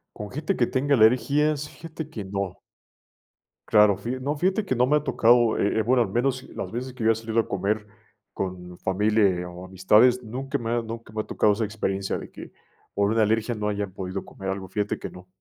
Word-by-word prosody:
Con 105 -1 -7
gente 155 - -2
que 120 - +2
tenga 140 +2 0
alergias, 140 +5 +3
fíjate 160 -1 -8
que 115 -10 -7
no. 95 -1 -3 1.1
Claro, 105 -2 +5
fija 120 +6 -4
no, 140 +3 -2
fíjate 190 +7 0
que 130 - 0
no 125 +1 +3
me 150 +3 +3
ha 150 - -3
tocado, 120 -3 +4
eh 100 - +1
eh, - - +4
bueno, 125 +2 +3
al 110 - -5
menos 130 +3 0
las 95 - -6
veces 125 +2 -5
que 125 - -6
yo 110 - +5
he - - +1
salido 115 +1 -1
a 115 - 0
comer 105 +2 -1 0.5
con 90 -2 -5
familia, 105 +3 +2
eh, 90 -3 +2
o 90 +1 -9
amistades, 105 +7 +4
nunca 130 +4 -4
me 115 -1 -4
ha 120 0 +1
nunca 115 -1 -8
me 110 - -1
ha - - -7
tocado 105 - +2
esa 110 +3 -2
experiencia 100 -2 -2
de - - -9
que, - - -11 0.4
por 100 0 +1
una 115 0 +2
alergia 110 +2 +1
no 105 -1 -2
hayan 100 -2 -3
podido 95 0 -5
comer 95 0 -7
algo, 95 0 -4
fíjate 105 +2 -2
que - - -6
no. 90 0 -13
110 Hz, 220 wpm, -25 LUFS, 100-125 Hz, 1.1 s, Claro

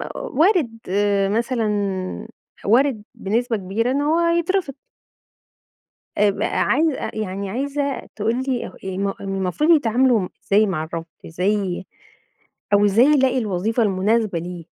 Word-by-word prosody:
وارد 310 - +1
آآ 200 0 +1
مثلًا 210 -5 -1 0.4
وارد 235 +1 +3
بنسبة 230 +3 -1
كبيرة 205 +6 -1
إن 280 +2 0
هو 310 +3 +2
يترفض 340 -1 +1 1.4
آآ 205 0 +4
ب - - -4
عايزة 300 +1 +1
يعني 200 -2 -4
عايزة 280 +4 -2
تقول 225 +4 -1
لي 255 -3 -1
ه - - -8
م 190 +1 -2
م 195 - -2
المفروض 195 - 0
يتعاملوا 245 - +3 0.2
إزاي 210 +2 +4
مع 175 -6 -2
الرفض 165 +1 -5 0.2
إزاي 185 +2 -1 0.9
أو 205 0 +5
إزاي 210 +5 +5
يلاقي 265 -3 +3
الوظيفة 220 +1 0
المناسبة 205 -1 +1
ليه؟ 175 0 -7
215 Hz, 125 wpm, -21 LUFS, 195-260 Hz, 1.4 s, أو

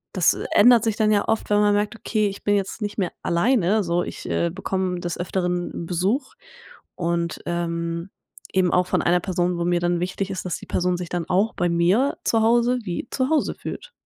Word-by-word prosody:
das 180 -3 +4 0.2
ändert 235 +1 +7
sich 225 -2 0
dann 215 -1 +3
ja 205 -1 +2
oft, 225 -1 -1
wenn 205 - +3
man 205 0 +4
merkt, 205 +2 -1
okay, 215 -1 0
ich 200 0 -7
bin 205 - +2
jetzt 200 +3 -2
nicht 205 0 -4
mehr 185 - 0
alleine 210 +2 +2
so, 175 0 0
ich, - - -7
äh, 170 - +1
bekomme 185 -1 -2
des 175 -1 -3
Öfteren 175 -1 -2
Besuch 195 - -1 0.6
und, 170 -1 -2
ähm, 170 0 -2 0.4
eben 185 -2 +2
auch 180 0 +3
von - - +1
einer 175 +1 +3
Person, 180 -1 -1
wo 170 - -1
mir 175 0 +2
dann 175 0 +1
wichtig 185 +2 -2
ist, 185 - -5
dass 180 - -2
die - - -13
Person 180 0 0
sich 175 -1 -6
dann 175 -2 -3
auch 195 +5 +2
bei 175 - +1
mir 180 +11 +2
zu 225 - +2
Hause 240 +2 +3
wie 185 +3 -4
zu 260 0 0
Hause 315 - +1
fühlt. - - -8
185 Hz, 210 wpm, -23 LUFS, 175-210 Hz, 0.6 s, ändert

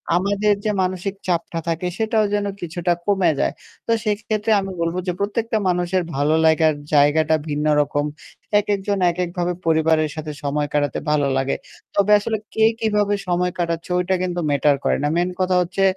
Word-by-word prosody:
আমাদের 200 +3 +2
যে 215 - +2
মানসিক 185 +1 -2
চাপটা 170 -1 -1
থাকে 170 +2 -1
সেটাও 220 -1 +1
যেন 205 0 0 0.2
কিছুটা 175 +1 -1
কমে 195 -5 +3
যায়। - - +1 0.3
তো - - +1
সেক্ষেত্রে 215 +1 -1
আমি 195 0 -5
বলব 165 +1 -1
যে - - +2
প্রত্যেকটা 220 +3 -1
মানুষের 180 0 0
ভালো 145 +3 +2
লাগার 160 0 +4 0.2
জায়গাটা 150 +2 +4
ভিন্ন 150 +1 -1 0.2
রকম। 145 0 -1 0.5
একেকজন 200 -1 -1
একেকভাবে 175 0 -2
পরিবারের 160 -1 +2
সাথে 155 -1 -5
সময় 145 +1 -1
কাটাতে 145 -3 0
ভালো 150 -2 +2
লাগে। 135 +1 0 0.4
তবে 200 +1 +3
আসলে 220 +2 -2 0.2
কে 220 - +2 0.2
কিভাবে 210 -2 +1
সময় 180 0 +1
কাটাচ্ছে 170 -1 -2
ওইটা 180 +1 +1
কিন্তু 180 -1 -2
ম্যাটার 145 0 +3
করে - - +2
না। - - +2
মেইন 175 +1 +1
কথা 185 0 +2
হচ্ছে 185 +2 -1
180 Hz, 165 wpm, -21 LUFS, 160-200 Hz, 0.5 s, লাগার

